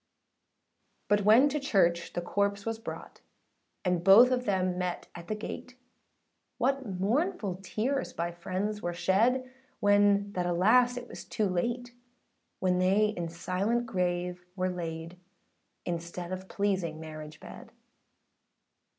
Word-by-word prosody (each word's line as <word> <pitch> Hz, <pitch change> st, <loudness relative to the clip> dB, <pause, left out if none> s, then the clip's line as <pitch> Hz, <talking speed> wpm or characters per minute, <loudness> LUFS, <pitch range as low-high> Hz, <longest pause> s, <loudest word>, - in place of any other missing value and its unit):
But 205 Hz, -1 st, +3 dB
when 230 Hz, +7 st, +7 dB
to 300 Hz, +2 st, -1 dB
church 175 Hz, -10 st, +1 dB
the 175 Hz, -, -3 dB
corpse 200 Hz, +1 st, 0 dB
was 225 Hz, -1 st, -2 dB
brought, 225 Hz, -, -8 dB, 0.6 s
And 180 Hz, -2 st, +1 dB
both 215 Hz, +7 st, +8 dB
of 250 Hz, 0 st, 0 dB
them 185 Hz, -2 st, 0 dB
met 180 Hz, -1 st, -2 dB
at 170 Hz, 0 st, -10 dB
the 215 Hz, -, -2 dB
gate; 250 Hz, +4 st, -7 dB, 0.8 s
What 270 Hz, -2 st, 0 dB
mournful 220 Hz, -, 0 dB
tears 245 Hz, +8 st, -2 dB
by 170 Hz, +1 st, -3 dB
friends 190 Hz, +5 st, -3 dB
were 175 Hz, 0 st, -3 dB
shed, 235 Hz, +9 st, +2 dB, 0.3 s
When 205 Hz, 0 st, +4 dB
that 180 Hz, -1 st, -1 dB
alas 235 Hz, +8 st, +4 dB
it 245 Hz, 0 st, -6 dB
was -, -, -9 dB
too 215 Hz, -3 st, -1 dB
late,â 240 Hz, +7 st, -2 dB, 0.7 s
When 180 Hz, -1 st, +1 dB
they 195 Hz, +4 st, +3 dB
in 175 Hz, -5 st, -4 dB
silent 185 Hz, +8 st, -1 dB
grave 180 Hz, -3 st, -2 dB
were 185 Hz, -1 st, 0 dB
laid, 165 Hz, 0 st, -5 dB, 0.7 s
Instead 170 Hz, +1 st, -4 dB
of 185 Hz, 0 st, -6 dB
pleasing 190 Hz, -6 st, -1 dB
marriage 155 Hz, -1 st, -9 dB
bed. -, -, -11 dB
195 Hz, 135 wpm, -29 LUFS, 175-225 Hz, 0.8 s, both